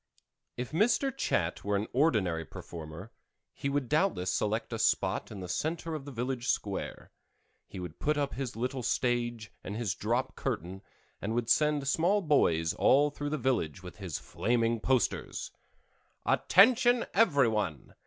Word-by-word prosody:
If 125 0 -4
Mr. 235 - +2
Chat 85 +1 -1
were 105 0 0
an 100 +2 0
ordinary 110 - +2
performer 80 +5 -9 0.4
he 140 - -3
would 140 -2 -1
doubtless 150 - +1
select 110 +3 -1
a 115 - -3
spot - - +1
in 100 -3 -8
the 90 - -6
center 160 - -2
of 150 -3 -5
the 140 - -7
village 125 0 -3
square; 100 -2 -3 0.6
he - - -8
would 90 -3 -7
put 150 0 +1
up 140 -1 -1
his 130 -2 -4
little 125 +3 -2
stage 120 -2 -1
and 100 - -5
his 110 -5 -1
drop 120 +7 -1
curtain 95 +3 -4 0.4
and 110 +3 -2
would 120 -1 0
send 150 0 +2
small 180 +8 +2
boys 85 - +3
all 145 +10 +4
through 145 0 -4
the 155 - -1
village 105 - -1
with 90 - -10
his 95 -7 -4
flaming 115 -1 0
posters: 130 +2 0 0.7
ATTENTION, 240 +4 +5
EVERY 145 - +4
ONE! 105 -10 -3
120 Hz, 155 wpm, -30 LUFS, 100-145 Hz, 0.7 s, ATTENTION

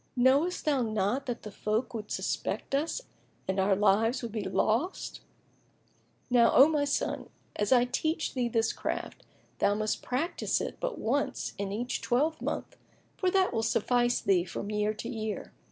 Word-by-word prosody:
Knowest 275 +8 +3
thou 285 -4 +2
not 220 +4 0
that 245 -2 -4
the 210 - -7
folk 215 +5 -1
would 215 -2 -5
suspect - - -2
us 310 - 0 0.5
and 190 +1 0
our 195 +1 +3
lives 215 +5 +3
would 235 - -4
be 215 0 -2
lost? 245 - -1 1.1
Now, 240 -2 +5
O 270 - +9
my 300 -2 +1
son, 280 - -1 0.3
an 210 - 0
I 245 -1 +6
teach 315 +6 -1
thee 245 -2 0
this 225 -1 +1
craft, - - -4 0.4
thou 205 0 +3
must 215 0 -1
practise 275 +8 -1
it - - -4
but - - -2
once 275 +6 -1
in 200 -1 -2
each 240 +5 -2
twelvemonth; 300 +6 -1 0.4
for 370 - +1
that 375 -3 +2
will 225 - +1
suffice 240 +2 +2
thee 190 -3 +3
from 195 +3 -5
year 210 0 0
to 225 - -6
year." 220 -3 -4
240 Hz, 165 wpm, -29 LUFS, 215-275 Hz, 1.1 s, O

